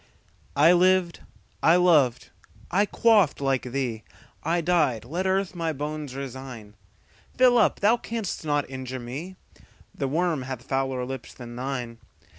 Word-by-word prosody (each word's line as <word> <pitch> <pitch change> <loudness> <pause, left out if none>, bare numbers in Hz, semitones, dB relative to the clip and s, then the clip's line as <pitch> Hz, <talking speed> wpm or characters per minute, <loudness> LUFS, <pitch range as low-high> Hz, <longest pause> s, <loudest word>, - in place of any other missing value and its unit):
I 155 +5 +6
lived, 180 -1 +3 0.4
I 165 - +5
loved, 150 -9 +3 0.4
I 200 +4 +3
quaffed 210 -8 +3
like 135 -3 -1
thee;I 135 +6 -4
died: 155 -10 +1
let 175 +9 -2
earth 190 0 0
my 165 -2 -2
bones 150 -1 -5
resign:Fill 130 - -2
up 220 - +2
thou 215 +4 +4
canst 225 -7 -4
not 145 -2 0
injure 130 -1 -6
me; 140 +10 -7 0.6
The 135 - -2
worm 160 +1 0
hath 130 -2 -6
fouler 135 -2 -1
lips 130 -2 -7
than 120 -1 -9
thine. 125 -2 -4
140 Hz, 130 wpm, -25 LUFS, 130-180 Hz, 0.6 s, I